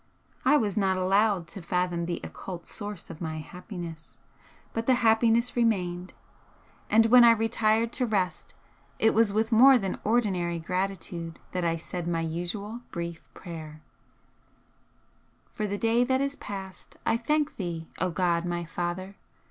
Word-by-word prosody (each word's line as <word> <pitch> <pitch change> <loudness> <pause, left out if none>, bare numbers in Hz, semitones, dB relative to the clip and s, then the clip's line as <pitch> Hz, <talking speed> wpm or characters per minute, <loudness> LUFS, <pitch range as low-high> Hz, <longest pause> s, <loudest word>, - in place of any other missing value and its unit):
I 290 +3 +5
was 210 -6 -1
not 190 -2 +2
allowed 195 0 +2
to 195 - -6
fathom 175 0 -1
the 175 - -2
occult 175 -3 -7
source 205 -4 -7
of 160 - -11
my 160 -1 -3
happiness, 170 0 -8 0.6
but 225 0 -3
the 260 - +5
happiness 230 +1 +3
remained, 185 -6 0 0.8
and 225 +1 +5
when 245 +2 +8
I 235 - +9
retired 225 0 +1
to 250 -2 0
rest 195 -5 -1 0.4
it 225 - +3
was 225 -2 +4
with 220 +3 0
more 260 +4 +8
than 195 -5 -3
ordinary 190 -7 +1
gratitude 175 -1 -3
that 180 -1 -2
I 165 -1 +1
said 170 +1 -5
my 165 -1 0
usual 175 +8 -4
brief 170 -1 -6
prayer: 155 -3 -9 1.7
For 215 -3 -2
the 205 0 -2
day 230 +3 +3
that 260 +1 +1
is 280 +1 -1
past, 190 -5 -8
I - - +3
thank 300 +6 0
Thee, 170 -4 -4
O 185 - +1
God 170 -1 +1
my 175 -1 -2
Father! 180 +4 -4
190 Hz, 150 wpm, -27 LUFS, 175-225 Hz, 1.7 s, I